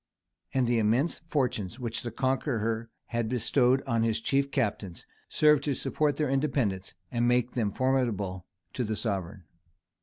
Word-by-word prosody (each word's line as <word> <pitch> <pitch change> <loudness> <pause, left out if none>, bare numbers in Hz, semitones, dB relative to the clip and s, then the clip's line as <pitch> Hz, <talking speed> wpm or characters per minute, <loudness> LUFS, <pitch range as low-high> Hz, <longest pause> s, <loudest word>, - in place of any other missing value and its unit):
And 130 -2 +2
the 120 -1 +2
immense 115 +9 +2
fortunes 125 - -1
which 115 -2 -2
the 120 - -4
Conqueror 115 -3 -1 0.2
had 115 -2 -1
bestowed 125 +2 +2
on 115 -1 0
his 115 0 +1
chief 140 +4 +1
captains, 100 -8 -2 0.2
served 150 -2 +4
to 145 -3 0
support 150 +3 0
their 150 - 0
independence, 130 -9 0 0.2
and 120 0 +1
make 125 0 +2
them 110 -5 -1
formidable 105 -8 0 0.3
to 125 - -1
the 110 -1 -2
sovereign. 95 -4 -3
120 Hz, 150 wpm, -28 LUFS, 110-135 Hz, 0.3 s, served